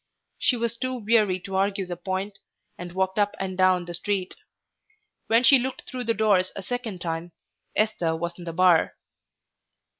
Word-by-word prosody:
She 250 Hz, -, +2 dB
was 235 Hz, 0 st, -1 dB
too 255 Hz, +2 st, -3 dB
weary 215 Hz, -5 st, +2 dB
to 195 Hz, +1 st, -6 dB
argue 195 Hz, 0 st, +1 dB
the 180 Hz, -1 st, -5 dB
point, 190 Hz, +3 st, -4 dB, 0.4 s
and 175 Hz, 0 st, -8 dB
walked 190 Hz, +2 st, 0 dB
up 205 Hz, 0 st, +2 dB
and 190 Hz, -1 st, -3 dB
down 185 Hz, -1 st, +3 dB
the 175 Hz, -, -7 dB
street. 190 Hz, +1 st, -2 dB, 0.9 s
When 230 Hz, +2 st, +4 dB
she 265 Hz, +2 st, +7 dB
looked 260 Hz, +1 st, -4 dB
through 250 Hz, -1 st, -6 dB
the 230 Hz, 0 st, +1 dB
doors 200 Hz, -4 st, +3 dB
a 195 Hz, -, -6 dB
second 225 Hz, -4 st, -4 dB
time 165 Hz, 0 st, -4 dB, 0.4 s
Esther 195 Hz, -7 st, +1 dB
was 170 Hz, +2 st, -4 dB
in 175 Hz, -, -8 dB
the 165 Hz, -, -5 dB
bar. 180 Hz, -1 st, +4 dB
190 Hz, 175 wpm, -25 LUFS, 180-220 Hz, 0.9 s, she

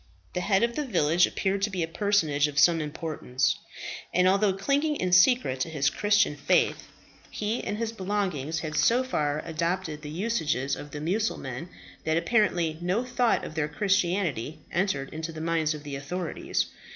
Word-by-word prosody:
The 180 Hz, -, -1 dB
head 195 Hz, +3 st, +2 dB
of 235 Hz, 0 st, +1 dB
the 300 Hz, -, -1 dB
village 175 Hz, -, +3 dB
appeared 195 Hz, 0 st, -1 dB
to 205 Hz, -, +1 dB
be 185 Hz, -4 st, -2 dB
a -, -, -2 dB
personage 165 Hz, -6 st, +2 dB
of 145 Hz, -1 st, -8 dB
some 165 Hz, +2 st, +5 dB
importance; 145 Hz, -4 st, -1 dB, 0.5 s
and 180 Hz, +1 st, +3 dB
although 195 Hz, +2 st, +4 dB
clinging 280 Hz, +11 st, 0 dB
in 185 Hz, -9 st, -1 dB
secret 185 Hz, -, +4 dB
to 165 Hz, -, -1 dB
his 145 Hz, -2 st, +1 dB
Christian 205 Hz, -6 st, +2 dB
faith, 140 Hz, -, +1 dB, 0.4 s
he 215 Hz, +3 st, -2 dB
and 205 Hz, -, -3 dB
his 225 Hz, 0 st, -2 dB
belongings 185 Hz, -7 st, -2 dB
had 155 Hz, -2 st, -4 dB
so 235 Hz, -, +4 dB
far 150 Hz, -, -1 dB
adopted 165 Hz, -1 st, -2 dB
the 150 Hz, -, -7 dB
usages 155 Hz, -, -1 dB
of 145 Hz, -, -9 dB
the 145 Hz, 0 st, -7 dB
Mussulmen 170 Hz, -, -2 dB, 0.3 s
that 160 Hz, 0 st, +1 dB
apparently 170 Hz, -4 st, +1 dB
no 185 Hz, +7 st, 0 dB
thought 250 Hz, -1 st, +1 dB
of -, -, -7 dB
their 155 Hz, -2 st, 0 dB
Christianity 175 Hz, -, 0 dB
entered 175 Hz, -7 st, -1 dB
into 160 Hz, +1 st, -4 dB
the 160 Hz, -, -8 dB
minds 160 Hz, -1 st, 0 dB
of 150 Hz, -, -9 dB
the 145 Hz, -2 st, -5 dB
authorities. 165 Hz, +5 st, -2 dB
170 Hz, 175 wpm, -27 LUFS, 150-205 Hz, 0.5 s, some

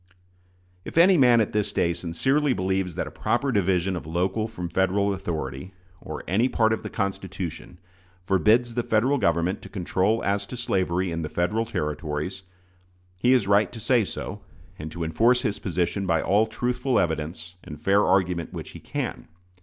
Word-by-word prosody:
If -, -, -8 dB
any 180 Hz, +3 st, +7 dB
man 125 Hz, -6 st, +5 dB
at 110 Hz, -, -1 dB
this 105 Hz, -1 st, 0 dB
day 85 Hz, -1 st, +1 dB
sincerely 130 Hz, -, +1 dB
believes 95 Hz, -3 st, -1 dB
that -, -, -2 dB
a -, -, -8 dB
proper 135 Hz, +3 st, 0 dB
division 95 Hz, -3 st, +1 dB
of 85 Hz, -, -6 dB
local 95 Hz, +6 st, -1 dB
from 90 Hz, -6 st, -6 dB
Federal 95 Hz, +3 st, +1 dB
authority, 80 Hz, -1 st, -5 dB, 0.3 s
or -, -, -7 dB
any 110 Hz, +8 st, +2 dB
part 110 Hz, -2 st, +2 dB
of 110 Hz, -, -2 dB
the -, -, -6 dB
Constitution, 95 Hz, -4 st, -4 dB, 0.5 s
forbids 110 Hz, +6 st, +3 dB
the 120 Hz, -, 0 dB
Federal 120 Hz, +5 st, +2 dB
Government 85 Hz, 0 st, +1 dB
to -, -, -11 dB
control 95 Hz, +3 st, 0 dB
as 100 Hz, 0 st, 0 dB
to 125 Hz, -, -7 dB
slavery 95 Hz, -5 st, 0 dB
in 85 Hz, 0 st, -3 dB
the 75 Hz, -, -4 dB
Federal 105 Hz, +8 st, 0 dB
Territories, 75 Hz, -1 st, -3 dB, 0.7 s
he 120 Hz, +8 st, +2 dB
is 125 Hz, -7 st, +3 dB
right 100 Hz, +1 st, +3 dB
to 120 Hz, -, -8 dB
say 120 Hz, +1 st, +3 dB
so, -, -, -6 dB, 0.4 s
and 80 Hz, 0 st, -6 dB
to 85 Hz, +1 st, -4 dB
enforce 115 Hz, -, +3 dB
his 105 Hz, -5 st, -1 dB
position 90 Hz, +2 st, -1 dB
by 85 Hz, -2 st, +2 dB
all 105 Hz, +6 st, +2 dB
truthful 125 Hz, +3 st, -1 dB
evidence 80 Hz, +1 st, -2 dB
and 75 Hz, -, -9 dB
fair 100 Hz, +6 st, +3 dB
argument 90 Hz, -3 st, +1 dB
which -, -, -7 dB
he -, -, -10 dB
can. -, -, -5 dB
95 Hz, 175 wpm, -25 LUFS, 85-110 Hz, 0.7 s, any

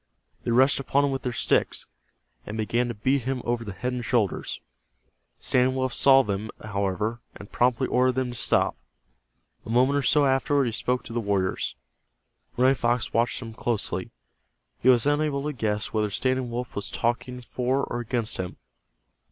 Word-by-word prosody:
They -, -, -3 dB
rushed 130 Hz, +4 st, +4 dB
upon 140 Hz, +1 st, +2 dB
him 140 Hz, -, 0 dB
with 135 Hz, -1 st, -2 dB
their 125 Hz, -, -2 dB
sticks, -, -, +1 dB, 0.6 s
and 105 Hz, -, -6 dB
began 120 Hz, +3 st, 0 dB
to 120 Hz, -, -4 dB
beat 130 Hz, +6 st, +1 dB
him 130 Hz, -1 st, -2 dB
over 120 Hz, 0 st, -1 dB
the 105 Hz, -, -6 dB
head 125 Hz, +6 st, -3 dB
and 125 Hz, -1 st, -3 dB
shoulders. 110 Hz, -3 st, 0 dB, 0.8 s
Standing 130 Hz, +1 st, +2 dB
Wolf 130 Hz, -1 st, -1 dB
saw 135 Hz, -1 st, +6 dB
them, 105 Hz, 0 st, -3 dB
however, 105 Hz, +3 st, -2 dB
and 100 Hz, -, -11 dB
promptly 125 Hz, +1 st, +2 dB
ordered 130 Hz, 0 st, +2 dB
them 130 Hz, -1 st, -1 dB
to -, -, -8 dB
stop. -, -, +1 dB, 0.9 s
A -, -, -11 dB
moment 130 Hz, +4 st, +3 dB
or -, -, 0 dB
so 145 Hz, +1 st, +3 dB
afterward 135 Hz, +1 st, +2 dB
he 120 Hz, -, -1 dB
spoke 125 Hz, +2 st, -1 dB
to 115 Hz, -, -9 dB
the 120 Hz, -, 0 dB
warriors. 100 Hz, -4 st, -1 dB, 0.8 s
Running 130 Hz, +2 st, +5 dB
Fox 120 Hz, -2 st, 0 dB
watched 120 Hz, +2 st, +1 dB
him 115 Hz, -1 st, -8 dB
closely. 115 Hz, -1 st, -2 dB, 0.7 s
He 130 Hz, -, +3 dB
was 125 Hz, -1 st, +5 dB
unable 145 Hz, -1 st, +1 dB
to 150 Hz, 0 st, -2 dB
guess 105 Hz, -4 st, -2 dB
whether 105 Hz, -1 st, +1 dB
Standing 130 Hz, +4 st, 0 dB
Wolf 120 Hz, 0 st, -5 dB
was 100 Hz, -, -3 dB
talking 125 Hz, +2 st, -2 dB
for 125 Hz, +3 st, -1 dB
or 120 Hz, -, -3 dB
against 120 Hz, -1 st, -2 dB
him. 90 Hz, -1 st, -5 dB
120 Hz, 175 wpm, -26 LUFS, 110-130 Hz, 0.9 s, saw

